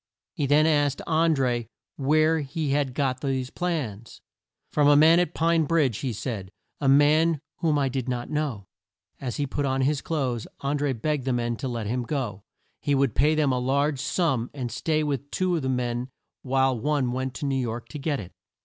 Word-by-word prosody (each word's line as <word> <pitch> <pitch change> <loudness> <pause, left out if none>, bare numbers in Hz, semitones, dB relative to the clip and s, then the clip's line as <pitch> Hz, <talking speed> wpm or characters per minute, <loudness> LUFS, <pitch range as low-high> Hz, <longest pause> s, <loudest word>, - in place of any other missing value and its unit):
He 145 - -1
then 150 +2 +5
asked 145 -3 +2
An 160 0 +3
dré 120 -4 0 0.3
where 155 +3 +3
he 150 0 -2
had 140 -3 0
got 130 -3 0
these 130 -2 -2
plans. 130 - -4 0.5
"From 145 -1 +3
a 145 - +7
man 160 +3 +7
at 175 -2 -1
Pine 165 -1 +2
Bridge" 145 -8 +1
he 130 - -2
said; 105 -4 -5 0.3
"a 140 - +2
man 150 +3 +4 0.2
whom 155 -3 +1
I 140 -1 +2
did 130 -1 -3
not 120 -1 -2
know." 145 -10 -2 0.5
As 125 -3 -4
he 145 - 0
put 145 +1 -2
on 135 -1 0
his 140 +2 +1
clothes 130 -8 -2
An 140 +1 -1
dré 140 -5 -1
begged 150 +1 -1
the 130 - +1
men 120 -1 -1
to 135 - -4
let 120 -3 -3
him 125 +4 -1
go. 120 -7 -3 0.4
He 145 - +1
would 135 -4 +2
pay 150 +3 +3
them 150 -3 +2
a 125 - +1
large 140 +3 +1
sum, 140 -5 0
and 125 -4 -4
stay 155 +7 0
with 145 -2 -2
two 185 +2 0
of 165 - -1
the 130 - -2
men 125 0 -1 0.3
while 135 0 +2
one 140 -1 0
went 130 +1 -3
to - - -4
New 140 -1 0
York 120 -1 -4
to 150 - -7
get 145 -1 -1
it. 95 -2 -8
140 Hz, 205 wpm, -26 LUFS, 125-150 Hz, 0.5 s, a